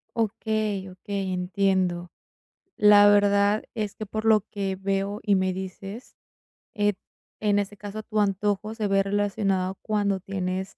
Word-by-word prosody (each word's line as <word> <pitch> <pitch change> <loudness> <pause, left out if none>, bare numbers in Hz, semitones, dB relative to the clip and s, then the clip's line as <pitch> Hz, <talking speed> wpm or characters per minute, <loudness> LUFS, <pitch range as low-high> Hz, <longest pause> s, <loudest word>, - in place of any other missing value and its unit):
Okey, 215 -3 -1
okey, 190 +1 -4
entiendo. 180 -1 0 0.7
La 205 -1 +7
verdad 205 0 +4
es 210 -3 -3
que 215 - -6
por 215 +2 -4
lo 220 -1 +5
que 195 -1 -4
veo 195 +2 -2
y 205 -2 +3
me 185 -1 +1
dices, 195 +4 -8 0.6
eh, 205 -2 +1 0.5
en 205 -1 +2
ese 205 0 -2
caso, 205 +2 -7
tu 215 -1 -2
antojo 205 +1 0
se 215 -2 -1
ve 195 0 +3
relacionado 195 -2 0
cuando 205 -2 0
tienes, 190 0 -4
200 Hz, 140 wpm, -25 LUFS, 190-210 Hz, 0.7 s, La